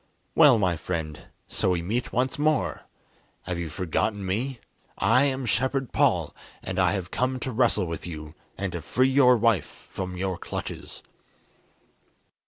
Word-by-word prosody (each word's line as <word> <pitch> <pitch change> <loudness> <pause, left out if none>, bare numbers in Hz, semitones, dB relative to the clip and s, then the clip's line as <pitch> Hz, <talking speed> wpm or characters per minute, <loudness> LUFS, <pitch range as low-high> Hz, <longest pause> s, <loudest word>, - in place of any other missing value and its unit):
"Well, 145 -7 +7
my 90 -5 +1
friend, 80 -3 -4 0.2
so - - 0
we 85 -2 0
meet 115 +7 -2
once 130 +3 0
more! 155 -1 +1 0.6
Have 90 -2 -3
you 85 -2 -3
forgotten 95 +4 -1
me? 115 +7 -2 0.4
I 125 +5 +4
am 135 -2 -1
Shepherd 130 +2 0
Paul, - - +2 0.3
and 95 0 -3
I 90 +1 +3
have 95 -3 -4
come 130 0 0
to 130 - -3
wrestle 115 -4 +2
with 85 +1 -5
you, 75 -2 -7 0.2
and 100 -2 -2
to 85 - -4
free 130 - +2
your 130 -2 +6
wife 115 -4 0
from 90 -1 -5
your 95 -1 -2
clutches." - - -6
105 Hz, 155 wpm, -26 LUFS, 90-130 Hz, 0.6 s, Well